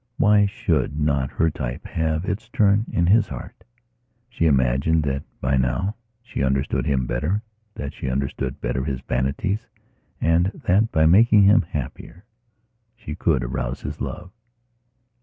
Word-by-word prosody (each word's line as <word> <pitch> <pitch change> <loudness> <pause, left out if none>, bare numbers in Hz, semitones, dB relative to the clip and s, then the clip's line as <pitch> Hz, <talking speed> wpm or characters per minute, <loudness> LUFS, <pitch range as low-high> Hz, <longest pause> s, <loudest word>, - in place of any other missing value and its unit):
Why 105 -1 +4
should 80 -5 -1
not 70 -3 +1
her 80 -1 +1
type 65 -7 -5
have 80 +1 -1
its 105 +3 -4
turn 105 -1 +2
in 85 - +1
his 105 +6 +4
heart? 65 - -9 0.7
She 85 -8 0
imagined 70 +4 +2
that, 70 -1 -1 0.2
by 65 +1 +1
now, 95 - 0 0.3
she 120 - -5
understood 65 0 0
him 65 -3 +1
better, 75 - -1 0.3
that 70 - -5
she - - -4
understood 65 0 -3
better 60 +2 -1
his 65 -3 -3
vanities 70 - -2 0.5
and 85 +2 +3 0.2
that, 105 +5 +3
by 80 0 +3
making 105 +5 +6
him 100 +2 +6
happier, 85 - -7 0.7
she 110 -10 -7
could 75 -5 +1
arouse - - -3
his - - -6
love. 90 +1 -5
80 Hz, 145 wpm, -23 LUFS, 65-100 Hz, 0.7 s, making